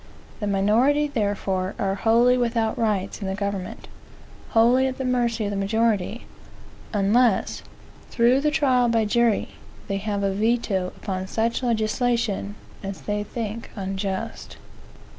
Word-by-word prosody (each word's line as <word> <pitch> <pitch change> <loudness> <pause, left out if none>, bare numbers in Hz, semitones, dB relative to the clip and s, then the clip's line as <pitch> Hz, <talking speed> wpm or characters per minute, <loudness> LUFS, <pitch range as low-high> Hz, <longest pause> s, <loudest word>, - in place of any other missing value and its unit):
The 210 - -2
minority, 225 +10 +3
therefore, 200 -5 -1
are 195 -1 0
wholly 230 +5 +4
without 230 -2 0
rights 215 -4 -1
in 195 - -3
the 190 - -2
government, 200 -2 -4 0.6
wholly 245 +4 +4
at 260 - -4
the 265 - -3
mercy 240 -3 0
of 205 - -2
the - - -3
majority, 215 +1 0 0.7
unless, 210 +2 +2 0.5
through 245 +3 +3
the 300 - +2
trial 255 -5 +2
by 225 -1 +2
jury, 235 0 +2 0.4
they 195 - -1
have 200 0 -2
a 195 - +1
veto 210 -3 0
upon 190 -2 -4
such 230 +5 -1
legislation 225 -3 0 0.3
as 195 -1 -6
they 210 0 -2
think 225 +1 -5
unjust. 195 -1 -4
220 Hz, 135 wpm, -24 LUFS, 200-240 Hz, 0.7 s, wholly